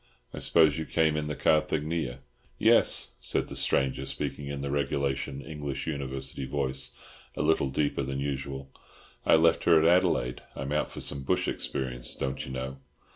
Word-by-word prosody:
"I - - -5
suppose 80 -2 +4
you 80 - -3
came 80 -1 +2
in 75 -1 -1
the 75 - -3
Carthaginia?" 75 -3 +1 0.4
"Yes," - - +4
said - - 0
the - - -7
stranger, 65 -1 +1
speaking 70 - -4
in 70 -1 -4
the 70 0 -3
regulation 70 -1 -1
English 75 -3 -4
University 70 -2 -3
voice, 65 -1 -2 0.5
a - - 0
little 75 -3 +2
deeper 70 +1 0
than 70 0 -3
usual. 70 -1 -4 0.6
"I - - +7
left 80 +1 +4
her 85 -2 +7
at 80 - +4
Adelaide. 85 -8 +3
I'm 70 +1 -4
out 75 0 0
for - - -7
some 70 - 0
bush 65 - +1
experience, 60 -2 -3
don't 65 0 -3
you 65 - -7
know. 65 +1 -4
70 Hz, 170 wpm, -28 LUFS, 65-75 Hz, 0.6 s, I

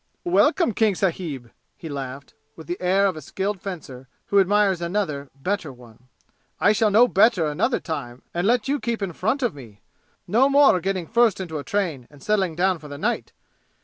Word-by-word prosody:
"Welcome, 345 - +3
King 215 -1 +2
sahib!" 160 - -3 0.3
he 165 - -9
laughed, 140 -1 -7 0.2
with 160 - -11
the 175 +4 -5
air 190 +2 +3
of 190 -3 +1
a 155 - -8
skilled 195 +6 -3
fencer 140 -9 -8 0.2
who 200 - +3
admires 195 -1 +2
another, 170 -6 -2
better 170 +2 -3
one. 120 -1 -17 0.5
"I 205 - +4
shall 215 0 +2
know 225 +5 +6
better 200 -5 +3
another 150 - 0
time 130 -6 -6
and 175 +3 0
let 240 -2 +2
you 285 +1 0
keep 235 -4 -3
in 185 -3 -3
front 220 - -1
of 240 - 0
me! 115 -8 -13 0.5
No 240 +9 +3
more 280 -9 +5
getting 185 -1 -2
first 230 0 +2
into 165 -5 -4
a - - -6
train 165 -12 -2
and 145 -2 -17
settling 195 -6 0
down 185 0 +1
for 150 - -11
the 145 -1 -8
night! - - -2
185 Hz, 190 wpm, -23 LUFS, 145-210 Hz, 0.5 s, know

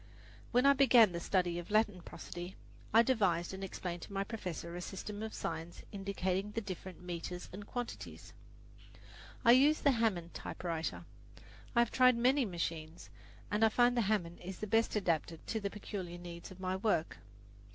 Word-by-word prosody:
When 250 +2 +4
I 280 - +8
began 250 -6 +6
the 170 - -3
study 175 -1 +1
of 175 - -8
Latin 210 -3 +2
prosody, 175 +2 -8 0.4
I 225 +2 +7
devised 195 -9 +1
and 190 0 -6
explained 175 -2 -5
to - - -9
my 195 0 0
professor 180 -6 -5
a 175 - -4
system 205 +3 -6
of 220 0 -4
signs 165 +1 -5
indicating 195 -1 -2
the 230 - 0
different 185 -3 -7
meters 180 0 -5
and 200 +2 -8
quantities. 245 -1 -6 1.1
I 235 - +9
use 285 +5 +6
the 280 - +5
Hammond 210 -9 0
typewriter. 165 -2 -4 0.7
I 235 - +6
have 235 - +1
tried 255 -2 +5
many 255 +3 +3
machines, 165 -3 -4 0.4
and 210 +2 +2
I 225 - +7
find 245 +2 +4
the 240 - +3
Hammond 190 -5 0
is 185 +1 -7
the - - -4
best 225 +2 +2
adapted 170 -4 -1
to 225 - -2
the 200 -1 -2
peculiar 195 -4 -6
needs 175 -1 -8
of 185 - -12
my 185 0 -1
work. 190 -5 0
195 Hz, 170 wpm, -34 LUFS, 175-225 Hz, 1.1 s, I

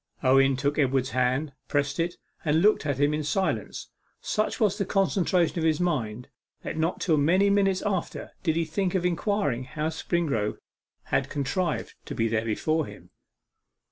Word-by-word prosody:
Owen 135 +1 +5
took 140 +3 0
Edward's 135 -3 +1
hand, 130 +4 0
pressed 145 0 0
it, 175 +1 0 0.3
and 160 +2 +2
looked 210 -7 +3
at 140 -2 -1
him 145 +1 +3
in 150 0 -1
silence. 185 +6 -2 0.3
Such 215 +4 -1
was 210 -4 +3
the - - +2
concentration 185 -3 +1
of - - -1
his 160 -2 +2
mind, 125 -10 -1 0.4
that - - -4
not 160 +2 -1
till 160 -4 +2
many 185 +7 +3
minutes 195 -2 +2
after 190 -4 -2
did 160 -4 0
he 165 0 +1
think 185 +4 -1
of 180 -1 0
inquiring 170 - 0
how 155 +3 -2
Springrove 160 - -1 0.6
had - - +2
contrived 155 +4 -2
to - - -6
be 115 - +1
there 110 0 0
before 155 +8 0
him. - - -13
155 Hz, 170 wpm, -26 LUFS, 135-180 Hz, 0.6 s, Owen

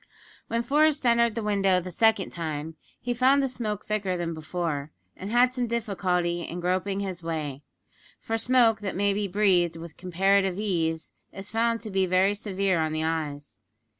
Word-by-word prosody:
When 230 +1 -1
Forest 300 +1 +2
entered 235 -2 +3
the 230 - -2
window 195 -3 +2
the 180 +1 -7
second 220 +1 +2
time 160 -1 -4 0.2
he 245 - -2
found 265 +3 +4
the - - +1
smoke 215 -5 -4
thicker 195 -4 -1
than 170 -1 -3
before, 155 -2 -4 0.2
and 195 - -7
had 245 +1 +4
some 250 -2 -1
difficulty 185 -7 -1
in 170 +1 -6
groping 185 +3 -1
his 185 -3 -5
way 155 -4 -4 0.6
for 225 - -3
smoke 235 -1 +3
that 200 -2 -4
may 200 +1 +2
be 205 0 -1
breathed 180 -4 +2
with 165 -1 -10
comparative 190 +1 +1
ease 165 -6 -1 0.2
is 195 +1 -9
found 230 0 +1
to 215 - -7
be 190 -1 +1
very 185 +2 +3
severe 195 -4 -1
on 155 0 -1
the 155 0 -1
eyes. 150 -7 -4
195 Hz, 175 wpm, -26 LUFS, 170-225 Hz, 0.6 s, found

